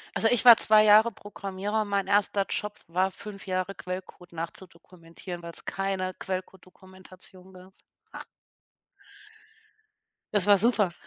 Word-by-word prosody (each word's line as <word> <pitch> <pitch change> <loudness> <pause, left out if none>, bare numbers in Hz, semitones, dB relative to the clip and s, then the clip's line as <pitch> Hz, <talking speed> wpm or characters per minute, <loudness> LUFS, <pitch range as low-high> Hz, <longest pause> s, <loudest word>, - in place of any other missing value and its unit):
Also, 225 - +2
ich 245 -1 +2
war 235 -2 +10
2 215 0 +5
Jahre 215 +2 +6
Programmierer. 205 +1 -4
Mein 200 -1 -1
1. 200 0 +2
Job 210 0 -4
war 185 +3 0
5 200 -1 -10
Jahre 185 +1 -2
Quellcode 180 -1 -8
nachzudokumentieren, 170 +1 -9
weil's 170 0 -8
keine 195 -1 -3
Quellcodedokumentation 185 0 -9
gab, 185 +1 -15 0.4
ha! - - -9 2.1
Das 205 -2 +1
war 205 -1 +6
super. 210 -4 +2
190 Hz, 120 wpm, -27 LUFS, 185-205 Hz, 2.1 s, war